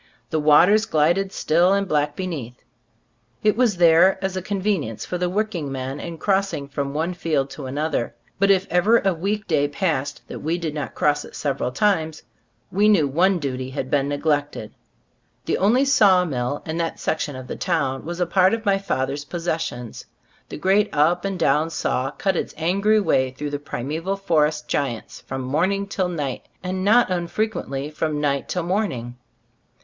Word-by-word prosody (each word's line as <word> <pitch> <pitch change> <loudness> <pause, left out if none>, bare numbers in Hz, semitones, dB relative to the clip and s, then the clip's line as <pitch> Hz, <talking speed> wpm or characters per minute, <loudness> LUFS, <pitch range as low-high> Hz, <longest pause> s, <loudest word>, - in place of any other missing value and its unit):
The 160 - +1
waters 180 +9 +5
glided 175 +3 +2
still 175 +3 +2
and 200 0 +1
black 150 -2 0
be 185 - -3
neath. 130 -9 -6 0.8
It 215 - +3
was 230 -5 +2
there 170 +2 +5
as 190 -1 -3
a 185 - -2
convenience 190 - -2
for 180 - -4
the 180 0 0
working 185 -7 -2
men 135 +1 -4
in 170 -1 -6
crossing 195 -6 0
from 140 0 -4
one 165 +4 -1
field 150 -6 -1
to 140 -3 -7
another; 145 -3 -2 0.2
but 200 0 +3
if 195 -1 +4
ever 200 +7 +4
a 195 -1 +2
week 205 +5 -2
day 145 -4 +2
passed 145 -3 -2
that - - -7
we 165 +3 -1
did 165 -3 -4
not 150 -1 -5
cross 145 0 +1
it - - -12
several 135 -3 -2
times, 160 -1 0 0.5
we 205 +3 +3
knew 170 -9 +4
one 180 +7 +2
duty 130 -4 -4
had 130 -1 -5
been 140 -1 +1
neglected. 145 -5 -1 0.7
The - - 0
only 235 +8 +3
saw 200 -9 +5
mill 130 -2 -3
in 160 0 -3
that 165 -1 -2
section 150 -3 -2
of 130 0 -7
the - - -6
town 140 -7 -1
was 170 +2 -5
a 180 - +2
part 185 +4 +3
of 230 0 -9
my 195 -1 +3
father's 140 -5 -2
possessions. 160 -8 -4 0.5
The - - -6
great 195 +5 +2
up 170 +5 +2
and 195 -1 -2
down 160 -1 +2
saw 135 -4 -1
cut 190 +6 -1
its - - -3
angry 200 +7 +2
way 130 -10 +2
through 145 +3 -6
the 145 - -3
primeval 155 +7 -3
forest 155 -6 +1
giants 125 -6 -3
from 135 0 -5
morning 185 +10 0
till 190 -2 -2
night, 145 -7 -4 0.2
and 185 0 -3
not 220 +1 +4
unfrequently 170 -6 -2
from 155 -1 -2
night 140 -2 -1
till 180 - -1
morning. 165 - -2
165 Hz, 180 wpm, -22 LUFS, 145-190 Hz, 0.8 s, waters